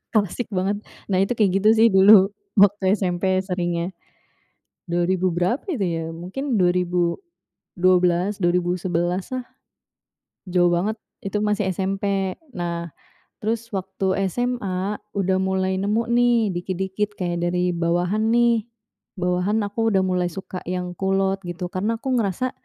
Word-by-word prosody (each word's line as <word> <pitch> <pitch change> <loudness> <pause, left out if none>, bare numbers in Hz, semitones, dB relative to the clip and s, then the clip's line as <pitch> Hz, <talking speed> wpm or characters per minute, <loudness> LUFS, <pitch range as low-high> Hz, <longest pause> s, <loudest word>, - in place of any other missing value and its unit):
klasik 215 +3 0
banget. 195 +2 0 0.3
Nah 185 - +2
itu 195 +5 +1
kayak 210 -4 +3
gitu 210 +2 +3
sih 225 +1 +5
dulu 195 0 +7 0.2
waktu 200 -1 +4
SMP 185 -1 0
seringnya, 175 -2 -2 1.0
2000 175 +2 +1
berapa 180 +9 +1
itu 290 - -1
ya? 165 -3 -1
mungkin 230 - -3
2012, 180 - 0
2011-lah. 180 +5 0 1.1
Jauh 175 -1 +3
banget 195 +6 0 0.3
itu 195 +1 -3
masih 210 -2 0
SMP. 195 +1 -1 0.2
Nah 170 -1 -3 0.6
terus 225 +1 -1
waktu 190 0 -1 0.2
SMA 210 -5 -2 0.2
udah 190 -1 +1
mulai 190 0 0
nemu 210 +4 0
nih 235 -3 +3
dikit-dikit 190 +3 -2
kayak 175 -2 -2
dari 180 0 0
bawahan 175 +6 +1
nih, 235 -1 +3 0.6
bawahan 180 +4 +1
aku 225 +2 0
udah 190 - +4
mulai 180 -1 0
suka 185 +1 -7
yang 180 0 -3
kulot 195 0 +1
gitu. 175 +1 -4
Karena 210 +5 -1
aku 260 +1 -1
ngerasa, 230 +2 0
190 Hz, 125 wpm, -23 LUFS, 180-210 Hz, 1.1 s, dulu